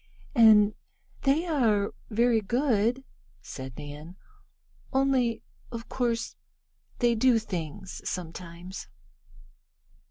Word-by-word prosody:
"And 215 -2 +7 0.5
they 290 +5 +2
are 225 - +2 0.2
very 230 0 +3
good," 240 +2 +1 0.4
said 130 -2 -8
Nan, 150 +4 -8 0.8
"only 265 -4 +2 0.3
of 230 0 -7
course 235 -2 -1 0.6
they 240 -1 +3
do 235 +1 +4
things 185 -3 -5
sometimes." 175 +1 -6
225 Hz, 85 wpm, -28 LUFS, 185-245 Hz, 0.8 s, And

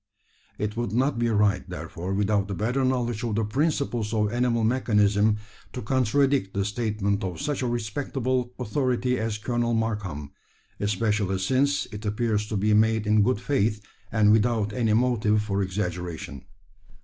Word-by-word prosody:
It 105 0 -3
would 120 -3 -2
not 130 +1 +1
be 120 0 +1
right, 105 -3 +2
therefore, 90 +3 -5
without 100 0 +1
a 100 - -2
better 120 +7 0
knowledge 120 -3 0
of 115 -3 -1
the 115 - +1
principles 120 -3 -1
of 105 0 +1
animal 120 -1 +1
mechanism, 105 -3 +2 0.4
to 125 - -5
contradict 130 -2 +1
the 100 0 0
statement 105 -1 -1
of 90 -2 -4
such 145 -1 -2
a 125 - 0
respectable 125 +2 -2
authority 125 0 0
as 110 -1 -2
Colonel 120 +1 -1
Markham 100 -11 -3 0.5
especially 105 -1 0
since 130 +9 +1
it 105 +1 -7
appears 105 0 0
to 110 - -2
be 105 +2 +2
made 110 0 +3
in 105 0 +4
good 105 0 +2
faith, 110 -5 0 0.3
and 110 -2 +4
without 110 -1 +2
any 115 -2 +1
motive 110 -3 +2
for 100 -2 -1
exaggeration. 90 -7 -4
110 Hz, 155 wpm, -26 LUFS, 105-120 Hz, 0.5 s, in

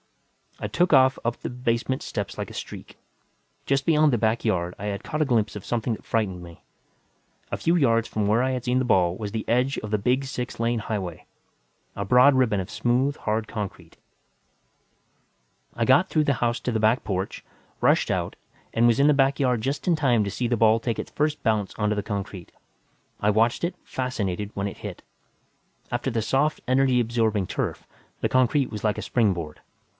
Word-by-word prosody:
I - - 0
took 175 -1 +1
off 130 -1 +5
up 120 0 0
the - - -5
basement 125 +1 -1
steps - - -4
like - - -4
a - - -11
streak. - - -8 0.7
Just 135 0 +1
beyond 155 -2 +4
the - - +3
back 110 +1 0
yard, 90 -5 0
I 100 - -6
had 100 0 -3
caught 155 - -3
a - - +3
glimpse 115 -6 +1
of 105 - -7
something 120 0 -1
that - - -9
frightened 100 -6 -1
me. 85 -1 -13 0.9
A - - -1
few 170 - +1
yards 115 -8 +3
from 105 -2 -1
where 110 +4 +3
I 130 - +1
had 125 -2 -3
seen 125 0 +1
the 130 - +1
ball 90 -6 +3
was 105 0 -5
the 110 0 -4
edge 125 +3 +1
of 105 - -7
the 105 - +1
big 125 +6 +1
six 125 -2 -5
lane 115 0 +1
highway, 100 -6 -4 0.7
a 100 - -3
broad 125 +6 +6
ribbon 115 -6 +2
of 95 - -5
smooth, 130 +4 +1
hard 110 0 -2
concrete. 100 -6 -7 1.8
I 115 - 0
got 135 +10 +4
through 155 -2 +2
the 140 - +2
house 120 0 +1
to 125 - -2
the 110 - 0
back 110 +3 +2
porch, 95 0 -3 0.4
rushed - - +3
out - - -2 0.4
and 115 +1 +3
was 115 +1 +3
in 140 - +5
the 150 - +5
back 135 0 +2
yard 125 -4 +1
just 135 +8 -3
in 175 - +4
time 125 -8 +2
to 100 - -3
see 125 - -2
the 120 0 0
ball 110 0 +4
take 115 0 -2
its - - -6
first 150 0 -1
bounce 110 -4 0
onto 105 0 0
the 105 - -2
concrete. 100 -3 -5 0.7
I 105 - +2
watched 115 +6 +2
it, 170 - -1
fascinated, 105 -6 -3
when 100 0 -1
it 100 - -7
hit - - -8 0.9
after 125 +2 -1
the 115 -1 0
soft, 135 +6 +1
energy 130 0 +3
absorbing 110 -4 0
turf, - - -3 0.3
the - - +1
concrete 130 +2 +2
was 105 -2 -6
like 105 -1 +1
a - - -3
springboard. 90 -10 0
115 Hz, 200 wpm, -25 LUFS, 105-130 Hz, 1.8 s, broad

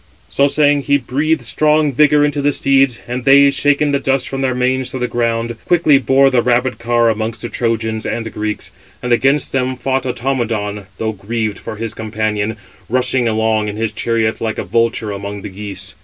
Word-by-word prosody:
So 140 - +2
saying, 145 0 +2
he 145 +1 +2
breathed 145 +1 -1
strong 150 +3 +2
vigour 150 +2 +4
into 145 -1 -1
the 145 +1 +2
steeds; 135 -3 +2
and 125 +1 -4
they, 140 +1 +6
shaking 145 +2 +2
the 140 - +1
dust 135 -1 0
from 135 0 -4
their 130 -1 0
manes 130 +1 0
to - - -5
the 125 -1 -1
ground, 115 -1 -1
quickly 160 -5 +4
bore 135 +2 +3
the 125 -2 +3
rapid 125 +1 0
car 120 0 +2
amongst 110 0 -4
the - - -4
Trojans 110 -2 -2
and 115 -1 -4
Greeks. 105 0 -4 0.3
And 125 -1 +1
against 135 +4 +2
them 130 -1 -1
561 - - -19
fought 130 +2 -1 0.4
Automedon, 105 -2 -4
though 110 -1 -2
grieved 110 +1 -3
for 110 - -7
his 110 +1 -5
companion, 110 -1 -2 0.3
rushing 125 0 +1
along 110 -1 +1
in 105 - -4
his 110 0 -2
chariot 115 0 -1
like 110 -1 -2
a - - -2
vulture 115 -2 0
among 100 0 -6
the - - -6
geese. 95 -1 -7
120 Hz, 195 wpm, -17 LUFS, 110-135 Hz, 0.4 s, they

